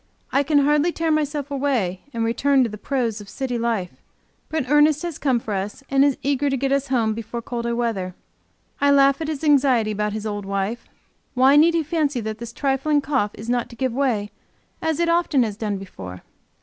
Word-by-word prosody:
I 275 Hz, -, +3 dB
can 290 Hz, +1 st, +2 dB
hardly 295 Hz, +3 st, +3 dB
tear 330 Hz, -1 st, -1 dB
myself 295 Hz, -2 st, -1 dB
away, 255 Hz, -10 st, -1 dB
and 230 Hz, -3 st, -1 dB
return 265 Hz, +4 st, +3 dB
to 235 Hz, -, -1 dB
the 210 Hz, -1 st, -8 dB
prose 235 Hz, -6 st, -2 dB
of 200 Hz, -, -12 dB
city 255 Hz, -3 st, -3 dB
life. 225 Hz, -6 st, -2 dB, 0.5 s
But 315 Hz, -5 st, -2 dB
Ernest 295 Hz, +2 st, +4 dB
has 345 Hz, -4 st, -4 dB
come 260 Hz, -4 st, +2 dB
for 220 Hz, -2 st, -5 dB
us, 200 Hz, +7 st, -4 dB
and 275 Hz, 0 st, +5 dB
is 285 Hz, -2 st, +2 dB
eager 285 Hz, 0 st, +1 dB
to 270 Hz, -, 0 dB
get 270 Hz, +1 st, -1 dB
us 275 Hz, 0 st, +1 dB
home 230 Hz, -4 st, +1 dB
before 230 Hz, +1 st, -5 dB
colder 235 Hz, 0 st, -3 dB
weather. 205 Hz, -7 st, -2 dB, 0.6 s
I 285 Hz, -, +3 dB
laugh 275 Hz, +1 st, +4 dB
at 315 Hz, -, -2 dB
his 310 Hz, -1 st, -4 dB
anxiety 265 Hz, -7 st, +3 dB
about 210 Hz, 0 st, -1 dB
his 215 Hz, 0 st, -4 dB
old 205 Hz, -1 st, -3 dB
wife. 200 Hz, +4 st, -2 dB, 0.5 s
Why 260 Hz, +3 st, +5 dB
need 330 Hz, +3 st, +5 dB
he 330 Hz, -, +2 dB
fancy 295 Hz, -4 st, 0 dB
that 220 Hz, 0 st, -5 dB
this 235 Hz, 0 st, -7 dB
trifling 280 Hz, +3 st, +1 dB
cough 265 Hz, -7 st, 0 dB
is 215 Hz, -, -9 dB
not 245 Hz, 0 st, 0 dB
to 235 Hz, -, -12 dB
give 255 Hz, 0 st, -1 dB
way 235 Hz, -6 st, 0 dB, 0.5 s
as 320 Hz, -1 st, -1 dB
it 340 Hz, -, +2 dB
often 335 Hz, -6 st, +2 dB
has 215 Hz, -3 st, -3 dB
done 210 Hz, -2 st, -2 dB
before? 95 Hz, -, -9 dB
260 Hz, 210 wpm, -22 LUFS, 220-285 Hz, 0.6 s, and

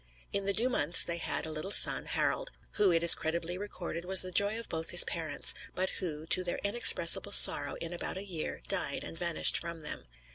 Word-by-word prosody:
In 200 Hz, 0 st, -5 dB
the 200 Hz, -, -2 dB
due 225 Hz, +6 st, -3 dB
months 170 Hz, -, +3 dB
they 170 Hz, 0 st, -8 dB
had -, -, -6 dB
a 160 Hz, -, -10 dB
little 155 Hz, +5 st, -9 dB
son, -, -, +3 dB
Harald; -, -, -5 dB, 0.2 s
who, 200 Hz, -3 st, -1 dB
it 165 Hz, 0 st, -3 dB
is 170 Hz, -, +9 dB
credibly 170 Hz, +2 st, -6 dB
recorded, 180 Hz, -4 st, -10 dB
was 190 Hz, +1 st, +3 dB
the 185 Hz, -, -9 dB
joy 205 Hz, +4 st, 0 dB
of 230 Hz, -, -9 dB
both 160 Hz, 0 st, -8 dB
his 175 Hz, -, +8 dB
parents; 160 Hz, -4 st, -1 dB, 0.2 s
but 185 Hz, +1 st, -5 dB
who, 155 Hz, -4 st, -9 dB
to 185 Hz, +3 st, +3 dB
their 175 Hz, -, -5 dB
inexpressible 205 Hz, +4 st, +4 dB
sorrow, -, -, +5 dB
in 165 Hz, +1 st, -9 dB
about 175 Hz, -, -8 dB
a 195 Hz, -, -9 dB
year 165 Hz, -, -9 dB
died, -, -, -4 dB
and -, -, -10 dB
vanished 170 Hz, -1 st, -1 dB
from 170 Hz, -1 st, -11 dB
them. 150 Hz, -, -9 dB
175 Hz, 215 wpm, -27 LUFS, 165-195 Hz, 0.2 s, is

